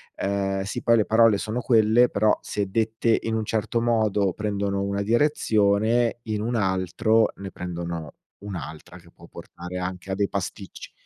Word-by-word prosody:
ehm 95 0 -1
sì 95 - -4
poi 115 -1 +4
le 105 - +2
parole 110 -2 +4
sono 110 +4 -3
quelle 115 0 +4
però, 105 +1 +2
se 100 -2 -3
dette 110 +2 +1
in 115 0 -1
un 110 -1 -1
certo 110 +2 -1
modo 105 -5 +1
prendono 100 -2 -2
una 100 0 -2
direzione, 115 -2 +2
in 105 -2 -3
un 120 +2 -2
altro 95 +3 +1
ne 95 -1 -7
prendono 85 -3 -6 0.2
un'altra 90 -4 -8
che 85 -1 -18
può - - -16
portare 90 +1 -9
anche 90 +1 -5
a 95 - 0
dei 100 0 +1
pasticci. 100 0 -6
105 Hz, 165 wpm, -24 LUFS, 95-110 Hz, 0.2 s, poi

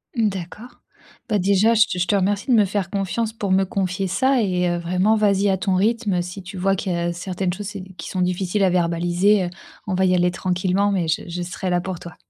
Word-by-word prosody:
Mmh, 225 -3 +2
d'accord. 195 +5 -9 0.5
Bah, 210 - +2
déjà 200 +4 +3
je 220 - +7 0.2
je 180 - +2
te 205 - +2
remercie 200 +3 0
de - - +6
me 210 - +5
faire 195 -2 -2
confiance 205 +3 -2
pour 200 -4 -3
me 190 +1 +4
confier 190 0 -2
ça 260 +6 +2
et 180 -3 0
heu, 175 - 0
vraiment 180 +5 +1
vas-y 200 -2 +2
à 190 - +2
ton 190 0 0
rythme. 205 -2 +1
Si 180 +2 -7
tu 190 +1 -9
vois 195 +2 +1
qu'il 190 -1 -2
y - - -1
a 170 0 -1
certaines 180 0 -3
choses, 205 +2 -7
heu, - - -4
qui 190 0 -12
qui - - -7
sont 185 - -2
difficiles 180 +2 0
à 190 - +4
verbaliser, 175 +2 +2 0.4
on 190 - -1
va 190 0 +2
y 185 - +3
aller 180 0 +2
tranquillement 185 +3 0
mais 180 -4 0
je 160 - 0
je 175 +1 -4
serai 180 +1 -4
là 175 - +2
pour 185 -2 -5
toi. 170 - -10
190 Hz, 245 wpm, -22 LUFS, 180-205 Hz, 0.5 s, je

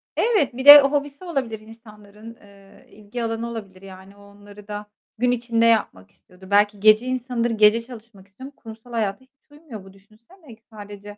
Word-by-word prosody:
Evet, 430 - 0
bir 260 - -6
de 290 0 +11
hobisi 285 +2 -3
olabilir 260 -10 -4
insanların, 215 0 -16
eee, 200 -2 -21
ilgi 215 +3 -9
alanı 225 +1 -4
olabilir. 200 -5 -10
Yani, 190 0 -14
o 205 - -19
onları 205 0 -17
da 210 0 -7 0.3
gün 245 +2 0
içinde 235 -1 -1
yapmak 215 - -1
istiyordur. 185 +1 -20
Belki 205 0 +2
gece 215 +3 +4
insanıdır, 250 -2 -3
gece 215 +1 +3
çalışmak 230 -5 -15
istiyor 200 +7 -13
ama 285 - -27
kurumsal 225 +1 -14
hayata 210 -4 -3
hiç 275 +2 -31
uymuyor 290 -9 -12
bu 190 0 -17
düşünsene. 230 - -21
İlk 220 - -20
sadece, 205 -1 -12
220 Hz, 175 wpm, -21 LUFS, 205-245 Hz, 0.3 s, de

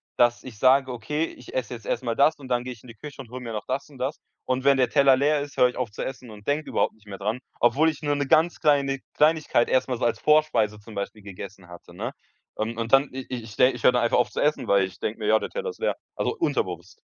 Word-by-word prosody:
dass 120 0 +3
ich 125 -5 -9
sage, 130 +3 +4
okay, 150 +7 -2
ich 125 - -12
esse 130 -1 -2
jetzt 115 -3 -9
erst - - -2
mal 115 - -1
das 155 +4 +4
und 135 - -10
dann 125 -1 0
gehe 125 - -5
ich 120 -3 -11
in - - -14
die 115 - -11
Küche 145 +3 -9
und 120 - -13
hole 130 +1 -7
mir 120 -2 -6
noch 105 -2 -4
das 135 +3 -3
und 140 - -15
das. 130 +4 -2 0.3
Und 130 0 -1
wenn 140 0 +5
der 130 -2 +3
Teller 135 0 +5
leer 145 +1 +2
ist, 145 0 -8
höre 125 - +6
ich 125 - -6
auf 125 -4 -3
zu 105 - -5
essen 125 -2 -7
und 105 -1 -13
denke 150 +2 0
überhaupt - - +1
nicht 110 -1 -26
mehr 100 -1 -7
dran, 105 +5 -2 0.2
obwohl 135 +7 +4
ich 155 -1 -6
nur 145 -1 0
'ne 140 -1 -1
ganz 160 +5 +3
kleine 140 -3 +2
Kleinigkeit 155 -5 +3
erst 130 - +2
mal 125 - -1
so 120 - -1
als 115 - 0
Vorspeise 140 -9 +3
zum 105 +1 -13
Beispiel 100 +2 -5
gegessen 100 -1 -10
hatte, 85 -1 -13
ne? - - -5 0.4
Und 110 +1 -3
und 115 +2 -3
dann 135 +1 +5
i 130 -1 -5
ich 125 -2 -4
ich 105 -3 -11
de 130 +1 +5
höre - - +7
dann 125 -1 +1
einfach 120 - +2
auf 125 - +1
zu - - -4
essen, 150 +1 +1
weil 100 -1 +4
ich 95 0 -11
denke 110 +2 -3
mir, 105 - -3
ja, 110 +1 +5
der - - -5
Teller 485 0 -4
ist - - -17
leer. 485 - 0 0.2
Also - - -1
unterbewusst. - - -2
125 Hz, 285 wpm, -25 LUFS, 110-140 Hz, 0.4 s, höre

